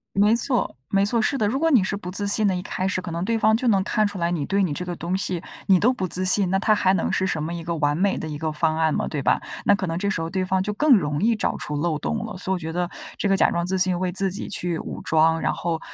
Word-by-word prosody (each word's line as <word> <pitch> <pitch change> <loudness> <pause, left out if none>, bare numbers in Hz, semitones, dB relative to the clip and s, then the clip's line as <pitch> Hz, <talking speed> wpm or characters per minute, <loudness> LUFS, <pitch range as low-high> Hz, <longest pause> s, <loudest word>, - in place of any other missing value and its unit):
没 210 +3 +4
错， 245 - -1
没 200 0 +2
错， 230 +2 +1
是 275 +5 0
的。 210 - +1
如 265 +6 -1
果 325 0 +2
你 245 -10 +4
是 195 - -2
不 180 -3 -7
自 200 +2 -4
信 205 +1 +4
的， 190 - +1
一 180 - -3
开 190 -1 -3
始 185 - -1
可 180 -2 -7
能 170 +2 -3
对 225 +2 0
方 220 0 +3
就 245 +2 -1
能 195 -4 +3
看 215 +1 +1
出 205 -1 -7
来 170 0 0
你 160 -5 -1
对 200 0 +1
你 160 -6 -1
这 180 - -4
个 175 -1 -5
东 175 +2 -3
西， 185 -3 -2 0.3
你 190 -2 +5
都 245 +7 +3
不 190 -6 -3
自 185 +2 -3
信， 185 0 +5
那 190 - +2
它 215 +2 +2
还 190 -2 +2
能 170 - -1
是 190 - 0
什 160 -4 -2
么 165 - -4
一 170 -1 -6
个 170 0 -3
完 145 -1 +1
美 195 +3 +1
的 - - -5
一 150 -1 -5
个 160 0 -2
方 155 +1 0
案 160 -1 +1
吗， - - -1
对 145 - -3
吧？ - - +2 0.3
那 205 - +5
可 195 -2 -3
能 165 0 -3
这 200 0 -1
时 180 - -1
候 165 - -2
对 185 +1 -1
方 185 0 0
就 210 +1 -2
更 270 0 +5
容 150 -3 -2
易 225 +1 +3
找 - - -1
出 150 - -5
漏 155 0 0
洞 225 +7 -3
了。 220 - -7
所 190 - -3
以 - - +1
我 - - -4
觉 160 0 -5
得 175 0 -1 0.3
这 200 - -1
个 195 - +3
假 - - +3
装 170 0 -1
自 190 +1 -1
信 185 -1 +1
为 185 -1 -1
自 190 0 +1
己 195 - -5
去 175 -4 -1
武 - - -6
装， 160 +1 +3
然 - - 0
后 165 -2 -2
185 Hz, 350 characters per minute, -23 LUFS, 170-205 Hz, 0.3 s, 你